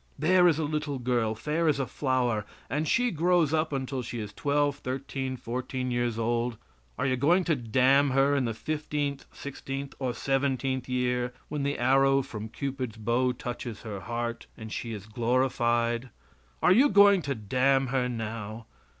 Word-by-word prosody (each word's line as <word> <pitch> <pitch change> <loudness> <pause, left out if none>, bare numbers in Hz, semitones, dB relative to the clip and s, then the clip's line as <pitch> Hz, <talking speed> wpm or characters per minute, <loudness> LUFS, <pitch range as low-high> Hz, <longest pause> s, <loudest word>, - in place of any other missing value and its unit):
There 180 +4 +5
is 160 -4 +3
a 160 - -1
little 150 -1 -2
girl, 120 -3 0
fair 155 +8 -1
as 145 -3 +2
a 135 - 0
flower, 125 -4 0 0.3
and 150 +3 0
she 245 - +2
grows 170 -2 +2
up 155 0 +1
until 135 -1 -2
she 120 0 -5
is 105 -1 -6
twelve, 145 +3 +1
thirteen, 130 0 -4
or - - -9
fourteen 125 +1 -3
years 120 -2 0
old. 120 +1 0 0.4
Are 125 - -1
you 130 -2 +2
going 165 +9 +3
to 170 -3 +1
damn 130 +4 +3
her 135 +2 +3
in 135 -3 +1
the 115 -2 -2
fifteenth, 145 0 -3
sixteenth 140 0 -6
or 125 -3 -2
seventeenth 135 -1 -1
year, 125 -1 0
when 150 -1 -3
the 140 +1 -1
arrow 135 +2 +4
from 110 -2 -7
Cupid's 130 -3 -4
bow 120 +4 +1
touches 120 -2 -6
her 105 -3 -5
heart 120 +2 -4
and 110 0 -7
she 115 - -4
is 105 -3 -6
glorified 120 +1 +1 0.5
are - - +6
you 265 +8 +5
going 200 -1 +6
to 140 -3 -2
damn 130 +5 +2
her 125 -2 +1
now? 110 -1 -5
130 Hz, 175 wpm, -28 LUFS, 120-140 Hz, 0.5 s, are